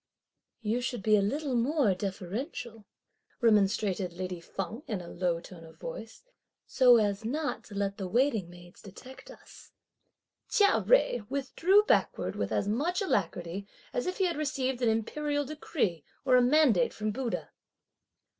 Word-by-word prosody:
"You 225 +3 0
should 245 -4 -3
be 215 -1 +5
a 205 - +4
little 275 +7 -1
more 245 -2 +2
deferential," 210 - -5 0.5
remonstrated 200 -4 +2
lady 180 -1 -5
Feng 195 +8 -5
in 210 -4 -2
a 175 - -9
low 175 -1 -1
tone 170 -1 -12
of 160 0 -14
voice, - - -8 0.4
"so 250 -2 +6
as 205 -1 0
not 290 +7 -2
to 205 - -11
let 200 0 -1
the 190 - -4
waiting 225 -4 +1
maids 175 +1 -15
detect 250 +7 -12
us." - - -15 0.8
Chia 410 -4 +4
Jui 245 - +2
withdrew 330 +9 +3
backward - - +1
with - - -2
as 200 - 0
much 315 - 0
alacrity 185 - -2 0.3
as 245 - -2
if 365 - -2
he 385 - +1
had 345 -4 -1
received 265 -4 -1
an 240 - +3
Imperial 290 +6 -1
decree 260 - -2 0.2
or 255 -1 +5
a 250 - +6
mandate 255 - +4
from 215 0 -2
Buddha. 245 +1 -4
225 Hz, 155 wpm, -29 LUFS, 195-280 Hz, 0.8 s, so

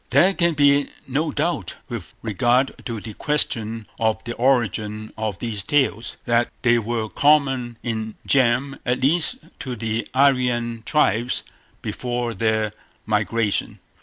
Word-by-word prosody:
There 190 +2 +5
can 170 -3 +2
be 145 -1 +4 0.2
no 145 +5 0
doubt, 150 - -1
with - - -7
regard 120 +5 +2
to 115 -3 -3
the 110 +1 -8
question 115 -6 0
of 110 -1 +1
the 120 - -4
origin 110 -4 0
of 110 -3 -3
these 110 -3 -2
tales, 130 -3 0
that 120 0 +2
they 120 -1 +4
were 115 0 -2
common 135 -3 +2
in 110 -2 -3
germ 130 +1 +2
at 125 +1 0
least 160 - +3 0.2
to 130 -3 -4
the 115 0 -2
Aryan 125 -4 +2
tribes 125 -5 +2 0.4
before 120 +2 -2
their 110 0 0 0.3
migration. 105 0 0
120 Hz, 135 wpm, -22 LUFS, 110-135 Hz, 0.4 s, There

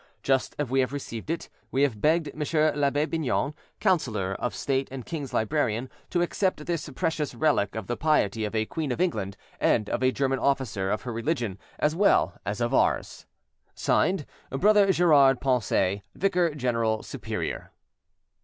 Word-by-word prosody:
Just 135 -1 +1
as 145 - -1
we 135 +2 +1
have 130 +1 +1
received 125 -3 -6
it, 165 0 -2 0.2
we 135 +2 +1
have 115 -8 0
begged 155 0 +2
M. 155 - -7 0.3
L'abbe 145 +1 +2
Bignon, 150 -3 -1 0.3
councillor 115 - +1
of 120 -6 -2
state 135 +5 -1
and 130 -2 -7
king's 145 -6 -5
librarian, 120 -1 0 0.2
to 175 -1 +1
accept 180 -3 -1
this 170 -3 -2
precious 160 -5 -1
relic 115 -7 +1
of 110 -3 -4
the 120 - -2
piety 115 -9 +1
of 105 +1 -3
a 110 0 +1
Queen 150 +3 -3
of 125 - -3
England, 105 - -1 0.2
and 105 -2 +2
of - - -1
a 130 0 +4
German 135 0 0
officer 120 -9 0
of 105 +1 -1
her 120 - -4
religion 115 - -2 0.2
as 150 +1 +1
well 200 +3 +3
as - - -2
of - - 0
ours. - - +1 0.5
"(Signed)BROTHER 195 +4 +2
GERARD 145 -8 +5
PONCET, 100 -6 +1
"Vicar 180 -5 +1
General 115 -5 0
Superior." - - -5
135 Hz, 165 wpm, -27 LUFS, 115-155 Hz, 0.5 s, GERARD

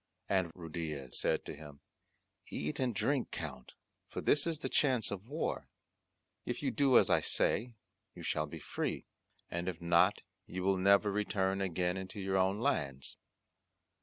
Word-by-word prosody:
And 95 -4 +1
Ruydiez 80 -6 -5
said - - +1
to - - -5
him, 75 -1 -11 0.7
"Eat 75 +1 -3
and 125 -4 0
drink, 135 +4 +1
Count, 70 -6 -7 0.3
for - - -5
this 145 +2 +3
is 165 -2 0
the - - -3
chance 130 -6 +2
of 100 +2 -5
war; 150 +5 -2 0.8
if 120 - -4
you 135 - +1
do 130 +1 +5
as - - +5
I - - +5
say 120 +1 +1 0.4
you - - -9
shall 75 0 0
be - - -7
free; - - -3 0.5
and 85 +2 -1
if 85 -3 -6
not 85 +4 +4 0.3
you 90 0 -4
will 95 0 +3
never 100 +2 +5
return 100 -1 0
again 90 -1 0
into 95 +2 -6
your 95 0 0
own 95 +2 +2
lands." 70 - -1
95 Hz, 165 wpm, -34 LUFS, 85-115 Hz, 0.8 s, do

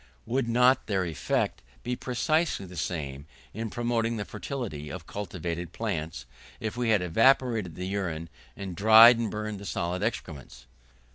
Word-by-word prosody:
Would 125 0 -1
not 125 +3 +4
their 95 -3 0
effect 80 -3 -1 0.2
be 125 +1 -2
precisely 155 - 0
the 90 0 -11
same 75 -4 -4 0.3
in 110 +2 -4
promoting 115 0 -1
the 105 - -3
fertility 105 - -5
of 90 -3 -7
cultivated 85 -3 -5
plants, 80 - -3 0.3
if 110 0 -4
we 120 -1 -1
had 105 -5 +3
evaporated 115 -1 +3
the 90 - -5
urine, 90 -5 -3 0.3
and 95 -3 -6
dried 110 +4 +8
and 115 -2 -1
burned 105 0 -4
the 100 - -9
solid 90 +1 -2
excrements? 80 - -5
100 Hz, 150 wpm, -28 LUFS, 85-115 Hz, 0.3 s, dried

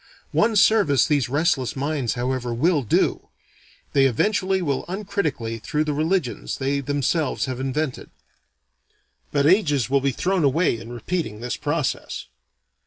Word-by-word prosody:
One 220 +1 +2
service 200 - +4
these 145 -5 +1
restless 145 -3 +1
minds 140 -3 -1
however 125 -1 -2
will 155 +4 +2
do: 115 - 0 0.7
they 135 -1 +5
eventually 190 - +1
will 145 -7 -1
uncritically 175 - -3
through 150 +7 -1
the 150 -1 -2
religions 155 - -1
they 140 +1 0
themselves 145 +3 0
have 130 -2 -4
invented. 135 +1 -3 1.2
But 140 -1 +2
ages 145 - +3
will 140 0 +3
be 140 0 +1
thrown 180 +6 0
away 140 -3 +2
in 115 +1 -10
repeating 120 -1 -3
this 120 +1 -3
process. 150 -1 -2
145 Hz, 135 wpm, -23 LUFS, 130-170 Hz, 1.2 s, they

